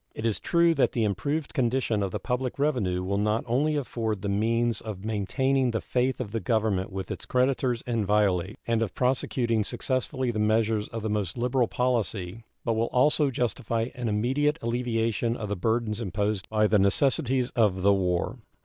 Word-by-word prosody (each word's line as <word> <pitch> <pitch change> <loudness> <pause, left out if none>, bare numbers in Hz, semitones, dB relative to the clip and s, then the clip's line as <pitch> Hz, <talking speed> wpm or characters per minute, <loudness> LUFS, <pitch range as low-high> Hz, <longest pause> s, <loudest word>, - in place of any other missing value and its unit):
It 110 - -4
is 110 -3 0
true 170 -1 +3
that 140 - +2
the 115 - +1
improved 140 - -1
condition 125 -5 +1
of 100 - 0
the - - -4
public 125 0 -2
revenue 120 -12 0
will 100 +2 -1
not 105 +2 +1
only 140 +6 +1
afford 115 -7 -2
the 100 - -1
means 115 +2 +1
of 105 -3 -7
maintaining 125 +5 +1
the 115 -1 -1
faith 125 +3 -1
of 115 -6 -4
the 115 - -1
Government 110 -5 0
with 95 0 -5
its - - -5
creditors 125 -1 +1
inviolate, 105 -4 +1
and 115 -1 +1
of 110 -5 -2
prosecuting 125 -3 +1
successfully 130 +2 -1
the 110 - -3
measures 110 0 +1
of 115 -1 -6
the 110 - -1
most 105 -1 -2
liberal 125 0 +1
policy, 115 -5 -1 0.2
but 115 - +1
will 115 +1 0
also 145 +4 +3
justify 115 -1 -1
an 125 -4 -3
immediate 135 +8 +1
alleviation 115 -1 0
of 105 -2 -5
the 105 - -1
burdens 110 +3 -1
imposed 100 -1 -2
by 110 -1 +2
the 105 0 +3
necessities 125 +5 +2
of 100 -6 +1
the 100 +1 +5
war. 90 -3 -1
115 Hz, 180 wpm, -27 LUFS, 105-125 Hz, 0.2 s, the